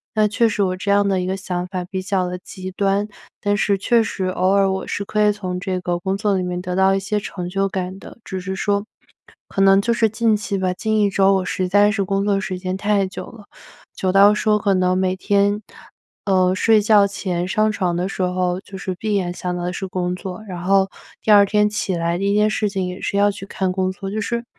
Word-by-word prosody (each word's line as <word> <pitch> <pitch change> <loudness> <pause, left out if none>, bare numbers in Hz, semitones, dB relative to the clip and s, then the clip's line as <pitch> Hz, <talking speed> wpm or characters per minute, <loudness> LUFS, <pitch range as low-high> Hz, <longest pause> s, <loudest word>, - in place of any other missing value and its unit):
那 215 -1 +4
确 230 +3 +2
实 210 -2 -1
我 185 -1 -1
这 200 +2 -1
样 200 0 +3
的 195 -2 +1
一 - - -2
个 190 +1 -1
想 180 -2 -3
法 185 -1 -4
比 185 +1 -4
较 185 -1 -1
地 180 0 -5
极 185 -1 -8
端， 200 +2 0 0.3
但 205 0 +1
是 200 -2 +1
确 230 +4 +2
实 190 -3 -3
偶 185 0 0
尔 195 -1 +3
我 190 0 -3
是 200 - -3
可 210 +1 +1
以 210 - +5
从 185 -3 -4
这 185 -1 -2
个 175 -1 -2
工 190 +2 -2
作 205 -1 +1
里 185 - 0
面 180 0 -3
得 180 0 -4
到 190 +1 +4
一 - - +1
些 210 +2 -1
成 180 -3 -6
就 195 +1 0
感 185 0 -4
的。 - - -12
只 190 - -5
是 190 +1 -4
说 200 +1 0 0.6
可 - - -5
能 195 0 +6
就 235 - 0
是 230 -1 +3
近 220 0 +2
期 205 -1 -4
吧， 185 -1 0
近 220 +3 -1
一 200 - +3
周 195 0 +3
我 185 -1 -1
实 185 0 -1
在 205 +2 +4
是 205 -2 0
工 195 +1 -1
作 200 -1 +2
时 185 -1 -4
间 185 0 -3
太 205 -1 +1
久 190 - -7
了， 215 -3 -13 0.5
久 185 - 0
到 200 +2 +6
说 210 0 +2
可 200 -1 +1
能 185 0 +2
每 185 0 +1
天， 205 +2 +1 0.6
呃， 185 -2 +3
睡 220 +3 +4
觉 205 -1 +5
前 180 -3 -3
上 215 +3 +1
床 180 -4 -1
的 180 +2 -1
时 195 - -5
候 180 0 0
就 195 0 -10
是 190 0 -4
闭 210 +2 -2
眼 180 -3 -1
想 180 0 -4
到 175 - -4
的 180 +1 -2
是 190 - -4
工 180 -1 -2
作， 185 +2 -7
然 180 -3 -6
后 195 +1 +3 0.3
第 215 - +2
2 205 -1 +8
天 210 +1 +2
起 210 -3 -2
来 170 +1 -1
第 200 +1 0
1 - - +1
件 210 0 +4
事 215 -1 0
情 195 -2 -2
也 180 +1 -7
是 200 - -2
要 205 0 +4
去 195 0 -9
看 190 -2 -2
工 185 0 -1
作， 195 +1 -7
就 215 +1 -2
是， 235 +3 -3
195 Hz, 270 characters per minute, -20 LUFS, 185-205 Hz, 0.6 s, 2